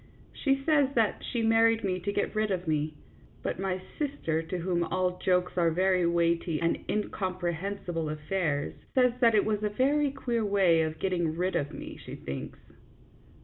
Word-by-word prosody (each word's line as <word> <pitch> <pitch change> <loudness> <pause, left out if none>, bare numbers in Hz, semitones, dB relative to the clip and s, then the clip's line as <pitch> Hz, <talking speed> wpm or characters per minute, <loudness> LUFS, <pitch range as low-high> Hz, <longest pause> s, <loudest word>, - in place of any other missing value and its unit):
She 275 -1 0
says 290 -4 +4
that 225 -3 +2
she 235 -3 -2
married 225 0 +4
me 185 -2 0
to 200 +3 -2
get - - -1
rid 215 0 0
of 180 -3 -2
me, 155 0 0 0.5
but - - -2
my 190 -1 -1 0.2
sister, 275 - -1
to 165 +3 -4
whom 175 0 0
all 180 +1 -1
jokes 180 -1 +1
are 170 -1 +4
very 180 +1 +2
weighty 170 -1 +1
and 170 0 +1
incomprehen 185 -2 -2
sible 165 -3 -2
affairs, 150 -1 -1 0.2
says 250 -2 +4
that 230 -3 +5
it 205 - +4
was 215 -1 0
a 210 - 0
very 280 +7 +2
queer 240 -4 -2
way 195 -5 +4
of 160 0 -2
getting 175 -3 -1
rid 185 +2 0
of 145 - -1
me, - - -8
she - - -7
thinks. 70 0 -6
185 Hz, 180 wpm, -29 LUFS, 170-220 Hz, 0.5 s, that